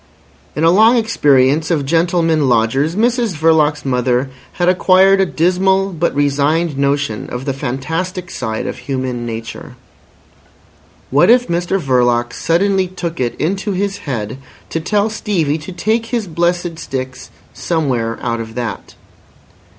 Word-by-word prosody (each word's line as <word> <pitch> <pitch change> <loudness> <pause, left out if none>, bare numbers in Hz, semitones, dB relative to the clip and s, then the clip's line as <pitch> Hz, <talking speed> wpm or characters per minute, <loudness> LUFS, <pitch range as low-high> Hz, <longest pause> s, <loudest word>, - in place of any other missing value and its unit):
In 150 - -1
a 165 - +5
long 220 +6 +5
experience 150 - +2
of 155 -5 0
gentlemen 165 -2 +1
lodgers, 125 +8 +1
Mrs 235 -2 +1
Verloc's 155 -1 +2
mother 125 0 0 0.2
had 175 - -1
acquired 190 +1 +4
a 190 - +2
dismal 190 +3 +1
but 170 -3 -1
resigned 145 +3 +1
notion 140 -5 -1
of 125 +2 -5
the 135 - -1
fantastic 160 +8 -4
side 110 -3 -4
of - - -5
human 130 -3 -3
nature. 115 0 -7 1.4
What 150 +8 +4
if 245 +1 +5
Mr 175 +3 -1
Verloc 120 -5 +1
suddenly 190 +3 +1
took 175 -2 -6
it 120 -2 -1
into 195 +5 -2
his 200 +1 -2
head 115 0 -4 0.3
to 165 - -1
tell 205 +5 0
Stevie 165 -8 -1
to 155 +5 -9
take 220 +6 -1
his 230 -2 -2
blessed 175 0 -1
sticks 130 -3 -6 0.2
somewhere 130 -9 -1
out 115 -1 -1
of 115 0 -7
that? 120 -4 -5
160 Hz, 140 wpm, -16 LUFS, 130-185 Hz, 1.4 s, a